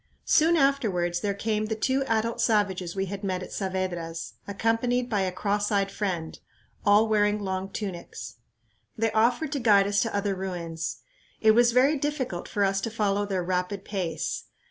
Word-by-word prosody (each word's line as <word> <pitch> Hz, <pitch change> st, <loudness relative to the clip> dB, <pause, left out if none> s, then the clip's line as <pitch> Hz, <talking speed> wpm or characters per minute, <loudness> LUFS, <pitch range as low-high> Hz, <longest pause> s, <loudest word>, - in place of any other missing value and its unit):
Soon 330 Hz, +2 st, +4 dB
afterwards 200 Hz, -, +1 dB
there 200 Hz, +1 st, -1 dB
came 215 Hz, +1 st, -1 dB
the 220 Hz, -, -1 dB
two 260 Hz, +5 st, +1 dB
adult 225 Hz, +1 st, 0 dB
savages 195 Hz, -5 st, +1 dB
we 195 Hz, 0 st, 0 dB
had 195 Hz, +1 st, -6 dB
met 185 Hz, -2 st, -2 dB
at -, -, -9 dB
Saavedra's, 185 Hz, -4 st, -3 dB
accompanied 230 Hz, +4 st, 0 dB
by 205 Hz, -2 st, +2 dB
a 185 Hz, -1 st, 0 dB
cross 205 Hz, +3 st, -1 dB
eyed 195 Hz, -1 st, +1 dB
friend, 180 Hz, -6 st, -3 dB, 0.4 s
all 205 Hz, +2 st, +5 dB
wearing 210 Hz, -1 st, +2 dB
long 190 Hz, -1 st, -3 dB
tunics. 175 Hz, -, -6 dB, 0.6 s
They 225 Hz, 0 st, +1 dB
offered 240 Hz, +7 st, +2 dB
to 285 Hz, -, -1 dB
guide 205 Hz, -5 st, +5 dB
us 200 Hz, 0 st, +2 dB
to 225 Hz, -, -1 dB
other 200 Hz, 0 st, 0 dB
ruins. 175 Hz, -4 st, -4 dB, 0.4 s
It 220 Hz, -, +6 dB
was 240 Hz, +2 st, +5 dB
very 270 Hz, +5 st, +4 dB
difficult 270 Hz, -, -2 dB
for 205 Hz, -, 0 dB
us 195 Hz, 0 st, +1 dB
to 230 Hz, -, -2 dB
follow 205 Hz, -2 st, 0 dB
their 190 Hz, -3 st, -1 dB
rapid 185 Hz, +2 st, -2 dB
pace. 180 Hz, -6 st, -3 dB
205 Hz, 170 wpm, -27 LUFS, 185-225 Hz, 0.6 s, It